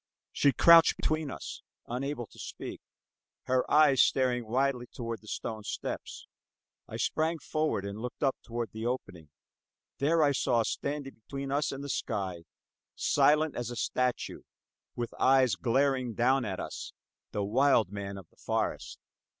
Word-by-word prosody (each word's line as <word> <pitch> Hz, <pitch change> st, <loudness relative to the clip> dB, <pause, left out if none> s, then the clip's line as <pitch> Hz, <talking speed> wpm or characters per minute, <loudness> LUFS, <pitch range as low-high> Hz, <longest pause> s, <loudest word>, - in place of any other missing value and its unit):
She 140 Hz, -, +3 dB
crouched 165 Hz, +3 st, +7 dB
between 155 Hz, -1 st, -1 dB
us, -, -, -7 dB, 0.2 s
unable 125 Hz, +1 st, -3 dB
to -, -, -18 dB
speak, -, -, -7 dB, 0.6 s
her 130 Hz, 0 st, +1 dB
eyes 145 Hz, -4 st, +6 dB
staring 125 Hz, -3 st, +2 dB
wildly 125 Hz, +1 st, 0 dB
toward 115 Hz, -4 st, -6 dB
the 110 Hz, -, -17 dB
stone 110 Hz, 0 st, -4 dB
steps. -, -, -5 dB, 0.6 s
I -, -, -6 dB
sprang 160 Hz, +1 st, 0 dB
forward 155 Hz, -9 st, -1 dB
and 100 Hz, +1 st, -5 dB
looked 125 Hz, +4 st, -5 dB
up 135 Hz, -2 st, +3 dB
toward 120 Hz, -1 st, -4 dB
the 110 Hz, 0 st, -6 dB
opening. 95 Hz, -, -4 dB, 0.7 s
There 160 Hz, +3 st, +3 dB
I 145 Hz, -, +4 dB
saw, 120 Hz, -3 st, +2 dB
standing 140 Hz, +3 st, -3 dB
between 135 Hz, +5 st, -6 dB
us 145 Hz, +2 st, +1 dB
and 135 Hz, +1 st, -6 dB
the -, -, -5 dB
sky, 95 Hz, -9 st, -3 dB, 0.5 s
silent 155 Hz, +1 st, +3 dB
as 120 Hz, 0 st, -3 dB
a 120 Hz, -, -5 dB
statue, 125 Hz, +1 st, -1 dB, 0.5 s
with 120 Hz, -1 st, -4 dB
eyes 130 Hz, -3 st, +5 dB
glaring 130 Hz, +1 st, +1 dB
down 130 Hz, +1 st, +3 dB
at 95 Hz, -3 st, -4 dB
us -, -, -6 dB, 0.4 s
the 105 Hz, -, -1 dB
wild 115 Hz, -1 st, +3 dB
man 100 Hz, -1 st, -5 dB
of 95 Hz, -4 st, -11 dB
the -, -, -30 dB
forest. -, -, -2 dB
125 Hz, 150 wpm, -30 LUFS, 115-140 Hz, 0.7 s, crouched